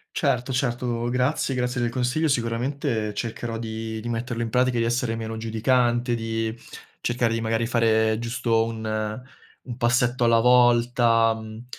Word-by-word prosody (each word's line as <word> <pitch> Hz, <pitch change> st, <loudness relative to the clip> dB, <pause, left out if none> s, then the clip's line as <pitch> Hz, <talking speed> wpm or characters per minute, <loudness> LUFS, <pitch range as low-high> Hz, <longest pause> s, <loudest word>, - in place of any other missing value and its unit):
Certo, 130 Hz, -2 st, 0 dB
certo, 120 Hz, -2 st, -1 dB
grazie, 130 Hz, +2 st, 0 dB
grazie 125 Hz, -1 st, -1 dB
del 120 Hz, -, +1 dB
consiglio, 125 Hz, +6 st, 0 dB
sicuramente 115 Hz, -3 st, -1 dB
cercherò 115 Hz, +1 st, -4 dB
di 110 Hz, 0 st, -5 dB
di 120 Hz, +2 st, -6 dB
metterlo 115 Hz, 0 st, -3 dB
in 115 Hz, -, -4 dB
pratica, 125 Hz, 0 st, +2 dB
di 115 Hz, -, +2 dB
essere 120 Hz, 0 st, 0 dB
meno 115 Hz, 0 st, -5 dB
giudicante, 120 Hz, +2 st, +1 dB
di 115 Hz, -1 st, -2 dB, 0.5 s
cercare 120 Hz, -1 st, 0 dB
di 115 Hz, -, -1 dB
magari 115 Hz, +1 st, 0 dB
fare 110 Hz, -2 st, +2 dB
giusto 115 Hz, -1 st, 0 dB
un 110 Hz, -1 st, -3 dB, 0.5 s
un 120 Hz, -2 st, -7 dB
passetto 120 Hz, 0 st, +2 dB
alla 115 Hz, 0 st, +4 dB
volta, 120 Hz, -1 st, +4 dB
mhmm, 110 Hz, +1 st, -9 dB
115 Hz, 150 wpm, -24 LUFS, 115-125 Hz, 0.5 s, alla